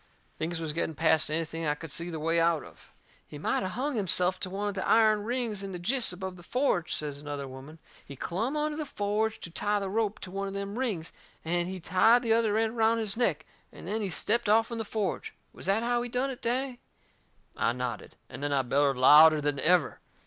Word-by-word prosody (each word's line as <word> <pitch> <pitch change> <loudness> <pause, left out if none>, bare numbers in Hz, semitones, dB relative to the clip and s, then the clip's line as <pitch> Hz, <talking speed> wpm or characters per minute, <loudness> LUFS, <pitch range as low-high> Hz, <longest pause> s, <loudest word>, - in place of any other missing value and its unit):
Things 165 +1 -2
was 160 -2 -3
getting 160 0 -2
past 160 0 +2
anything 165 +1 -2
I 150 - +1
could 160 0 -8
see 170 +4 -1
the 160 -2 -5
way 165 +2 +1
out 165 -4 +2
of. - - -16 0.4
"He 150 - -9
might 145 - 0
of 185 -1 -3
hung 280 +5 -2
himself 185 -3 +1
to 185 - -3
one 200 +2 -3
of 205 - -2
the 195 - -3
iron 215 -2 +4
rings 235 -4 -2
in 195 -1 -6
the - - -4
jists 230 +7 +1
above 185 0 -6
the - - -12
forge," 210 - 0
says 145 -2 -2
another 145 -1 -5
woman. 135 +4 -11 0.3
"He 140 - -10
clumb 220 - -2
onto 300 0 -1
the 310 - -3
forge 215 +1 -1
to 170 - -7
tie 205 +4 0
the 195 -2 -3
rope 215 -1 0
to 185 - -8
one 195 +1 -3
of 195 - -6
them 200 +3 -4
rings, 200 -11 -2 0.3
and 175 +1 0
he 190 0 -5
tied 225 +8 +4
the 225 -2 +3
other 225 -2 +2
end 225 0 +1
around 225 0 +2
his 215 -3 0
neck, 180 -10 0 0.3
and - - -11
then 215 +3 -2
he 200 - -2
stepped 210 +5 +1
off'n 225 +2 +2
the 225 - -3
forge. 205 -3 -3 0.2
Was - - -8
that 200 +4 +2
how 240 0 +1
he 245 - -4
done 255 +3 -1
it, 260 0 -9
Danny?" 250 +1 -2 0.8
I - - +1
nodded. 125 -3 -5
And - - -9
then 145 0 -1
I 135 -2 +2
bellered 135 +1 +2
louder 150 +4 +8
than 145 -1 -1
ever. 170 -3 +2
190 Hz, 230 wpm, -28 LUFS, 160-225 Hz, 0.8 s, louder